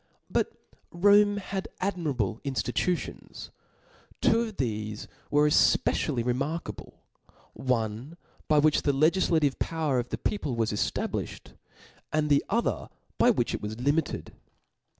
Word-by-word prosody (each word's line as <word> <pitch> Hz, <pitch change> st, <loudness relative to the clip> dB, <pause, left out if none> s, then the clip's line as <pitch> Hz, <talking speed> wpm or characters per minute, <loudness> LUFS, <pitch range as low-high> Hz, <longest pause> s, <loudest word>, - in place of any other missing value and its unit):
But -, -, +1 dB, 0.4 s
Rome 205 Hz, +3 st, +4 dB
had 195 Hz, -1 st, -4 dB
admirable 145 Hz, -, -1 dB
inftitutions. 140 Hz, +5 st, -3 dB, 0.7 s
Two 225 Hz, -, +3 dB
of 220 Hz, -3 st, -4 dB
thefe 110 Hz, -4 st, -3 dB, 0.2 s
were 150 Hz, +1 st, +4 dB
efpecially 140 Hz, -3 st, +2 dB
re 125 Hz, -, +2 dB
markable; 150 Hz, +6 st, -5 dB, 0.5 s
one 125 Hz, +4 st, -2 dB, 0.3 s
by 155 Hz, -, +3 dB
which 150 Hz, 0 st, +4 dB
the 140 Hz, -, +1 dB
Icgiflative 155 Hz, -1 st, +2 dB
power 155 Hz, -6 st, 0 dB
of 120 Hz, 0 st, -4 dB
the -, -, -3 dB
people 145 Hz, -, -2 dB
was 115 Hz, -1 st, 0 dB
eftablifticd, 105 Hz, -, -3 dB, 0.6 s
and 155 Hz, -1 st, +1 dB
the 140 Hz, -, +4 dB
other 235 Hz, +3 st, 0 dB, 0.3 s
by 245 Hz, -, +6 dB
which 185 Hz, -, +1 dB
it -, -, -3 dB
was 110 Hz, +2 st, -5 dB
limited. 145 Hz, +5 st, -1 dB
150 Hz, 125 wpm, -28 LUFS, 125-175 Hz, 0.7 s, by